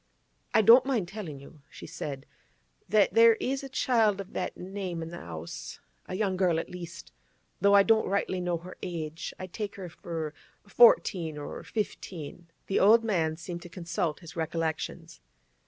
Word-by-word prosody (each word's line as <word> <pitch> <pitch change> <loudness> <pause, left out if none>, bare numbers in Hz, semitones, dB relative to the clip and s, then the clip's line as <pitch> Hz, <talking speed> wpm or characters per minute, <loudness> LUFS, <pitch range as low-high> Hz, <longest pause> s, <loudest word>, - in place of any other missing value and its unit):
'I 220 - +6
don't 240 +5 +8
mind 230 -10 0
tellin' 180 -10 -7
you,' 140 +2 -15
she - - -11
said, 135 -3 -6 0.6
'that 210 +1 +4
there 230 0 +7
is 265 +4 -2
a 270 - -7
child 225 -6 +2
of 195 - -7
that - - -3
name 185 -3 -5
in 165 - -7
the 175 - -7
'ouse, 80 -1 -8 0.3
a - - -4
young 195 -2 0
girl, 180 -3 +2
at - - -6
least. 170 -1 -9 0.5
Though 200 +2 +5
I 200 - +8
don't 220 +1 +3
rightly 190 -1 0
know 175 -1 0
her 180 +2 -11
age, 165 -2 -5
I 185 - -6
take 205 +3 -5
her 190 -4 -7
for 165 -3 -5 0.3
fourteen 185 -8 +4
or 145 - -6
fifteen.' 175 -6 -5 0.2
The 195 - +1
old 225 +4 +6
man 165 -8 0
seemed 175 +1 -6
to 175 - -10
consult 170 -2 -3
his 165 - -11
recollections. 165 0 -3
180 Hz, 170 wpm, -29 LUFS, 165-205 Hz, 0.6 s, don't